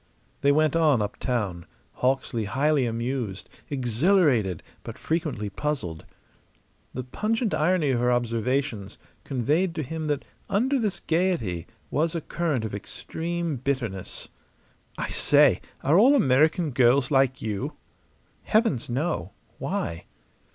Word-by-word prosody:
They 140 Hz, -, +4 dB
went 155 Hz, +1 st, +3 dB
on 155 Hz, -6 st, +4 dB
uptown, 105 Hz, -4 st, -2 dB, 0.3 s
Hawksley 125 Hz, -3 st, 0 dB
highly 135 Hz, +4 st, +2 dB
amused, 115 Hz, -3 st, -3 dB, 0.2 s
exhilarated, 130 Hz, -, +2 dB, 0.2 s
but -, -, -8 dB
frequently 155 Hz, -, -2 dB
puzzled. 130 Hz, -, -3 dB, 0.9 s
The 130 Hz, -, -3 dB
pungent 215 Hz, -, -1 dB
irony 155 Hz, -2 st, +2 dB
of 125 Hz, -, +1 dB
her 125 Hz, +1 st, +2 dB
observations 120 Hz, -2 st, -1 dB, 0.3 s
conveyed 150 Hz, +8 st, 0 dB
to 155 Hz, -, -2 dB
him 160 Hz, +3 st, -4 dB
that 145 Hz, -2 st, -1 dB, 0.2 s
under 260 Hz, +7 st, +2 dB
this 210 Hz, -5 st, -1 dB
gayety 160 Hz, -, 0 dB, 0.2 s
was 160 Hz, +3 st, 0 dB
a 165 Hz, -, -1 dB
current 155 Hz, -8 st, -1 dB
of 110 Hz, -, -5 dB
extreme 165 Hz, +9 st, -4 dB
bitterness. 120 Hz, -8 st, -3 dB, 0.7 s
"I -, -, -3 dB
say, -, -, +4 dB, 0.2 s
are 155 Hz, +7 st, +5 dB
all 265 Hz, +7 st, +6 dB
American 155 Hz, -, +3 dB
girls 125 Hz, +1 st, +3 dB
like 135 Hz, -1 st, +3 dB
you?" 105 Hz, -3 st, -3 dB, 0.7 s
"Heavens, 180 Hz, -, +1 dB
no! 120 Hz, -, -2 dB, 0.3 s
Why?" 85 Hz, 0 st, -3 dB
135 Hz, 120 wpm, -26 LUFS, 115-165 Hz, 0.9 s, all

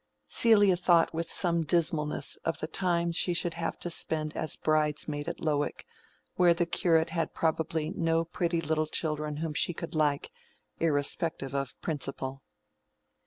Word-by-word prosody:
Celia 205 Hz, -, +5 dB
thought 175 Hz, -2 st, +3 dB
with 165 Hz, +1 st, -3 dB
some 170 Hz, -2 st, +2 dB
dismalness 160 Hz, -2 st, +1 dB
of 165 Hz, -, -3 dB
the -, -, -3 dB
time 170 Hz, 0 st, 0 dB
she 175 Hz, +1 st, +2 dB
should 170 Hz, -1 st, 0 dB
have 170 Hz, -1 st, -3 dB
to 175 Hz, -, -2 dB
spend 155 Hz, -1 st, +1 dB
as 155 Hz, -, +1 dB
bridesmaid 150 Hz, -1 st, 0 dB
at -, -, -7 dB
Lowick, 150 Hz, -2 st, -1 dB, 0.5 s
while 175 Hz, -2 st, +5 dB
the 175 Hz, -, +1 dB
curate 165 Hz, -1 st, +1 dB
had 165 Hz, -1 st, -2 dB
probably 160 Hz, 0 st, -1 dB
no 165 Hz, -2 st, 0 dB
pretty 170 Hz, 0 st, -1 dB
little 155 Hz, 0 st, 0 dB
children 150 Hz, -1 st, -2 dB
whom 160 Hz, 0 st, -3 dB
she 170 Hz, +3 st, 0 dB
could 165 Hz, -, -6 dB
like, 150 Hz, -3 st, 0 dB, 0.5 s
irrespective 145 Hz, -2 st, -1 dB
of 140 Hz, -2 st, -3 dB
principle. 135 Hz, -3 st, -4 dB
160 Hz, 150 wpm, -29 LUFS, 150-170 Hz, 0.5 s, Celia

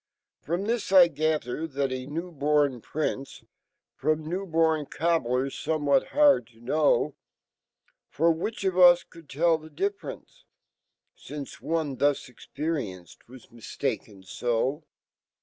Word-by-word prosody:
m)us 200 Hz, +7 st, -1 dB
I 180 Hz, -3 st, +8 dB
gather 155 Hz, -2 st, -1 dB
fhat 140 Hz, -2 st, -2 dB
a 130 Hz, 0 st, -4 dB
newborn 150 Hz, -5 st, 0 dB
Prince, 140 Hz, -1 st, -4 dB
j^ -, -, -31 dB, 0.5 s
From 155 Hz, 0 st, -1 dB
new^bopn 160 Hz, -4 st, 0 dB
cobbler^ 135 Hz, -5 st, 0 dB
5nnewhat 145 Hz, -4 st, +1 dB
hard 290 Hz, -, +4 dB
IP 145 Hz, +5 st, +1 dB, 1.0 s
For 165 Hz, +3 st, +2 dB
'which 200 Hz, +8 st, -3 dB
of 185 Hz, -1 st, 0 dB
us 175 Hz, -1 st, +8 dB
could 165 Hz, -4 st, -17 dB
telly 160 Hz, +2 st, +1 dB
e -, -, -15 dB
difference,$lnce 395 Hz, -, -8 dB
Onefhuj 145 Hz, -4 st, 0 dB
experienced 125 Hz, -, -6 dB
was 130 Hz, -1 st, -14 dB
mistaken 105 Hz, -3 st, -5 dB
so? 120 Hz, -, -1 dB
155 Hz, 105 wpm, -27 LUFS, 135-170 Hz, 1.0 s, I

